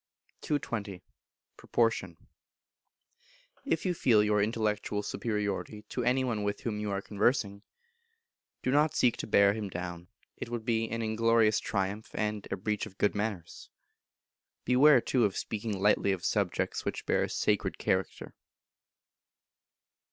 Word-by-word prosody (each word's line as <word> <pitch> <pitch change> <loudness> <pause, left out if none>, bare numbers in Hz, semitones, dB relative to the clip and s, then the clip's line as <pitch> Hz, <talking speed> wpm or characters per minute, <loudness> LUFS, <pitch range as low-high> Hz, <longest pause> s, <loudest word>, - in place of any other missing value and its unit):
220. 105 -10 -3 0.5
Proportion. 115 -1 0 1.5
If 180 - -1
you 180 - +1
feel 115 -10 +4
your 105 -1 +2
Intellectual 105 -1 -1
Superiority 105 -1 -3
to 125 - -2
any 125 +2 +2
one 115 -5 -1
with 100 0 -2
whom 105 -3 -3
you 105 0 -3
are 100 0 -2
conversing, 105 -1 0 1.0
do 130 - +1
not 150 +2 +3
seek 120 -2 +3
to - - -5
bear 100 -1 +5
him 105 -2 -4
down: 90 -1 -6 0.3
it - - -6
would 120 -2 -4
be 115 -2 0
an 115 0 -3
inglorious 110 0 +3
triumph, 100 +1 -3
and 105 -1 -2
a 100 - -1
breach 105 +2 -2
of 95 -2 -16
good 105 - +2
manners. 100 -5 -4 1.0
Beware, 130 +1 +6
too, 125 0 +1
of 100 -3 +1
speaking 105 -2 -3
lightly 100 0 +3
of 90 -3 -5
subjects - - -1
which - - -4
bear - - +2
a - - -1
sacred - - 0
character. - - -2
105 Hz, 140 wpm, -30 LUFS, 100-115 Hz, 1.5 s, Beware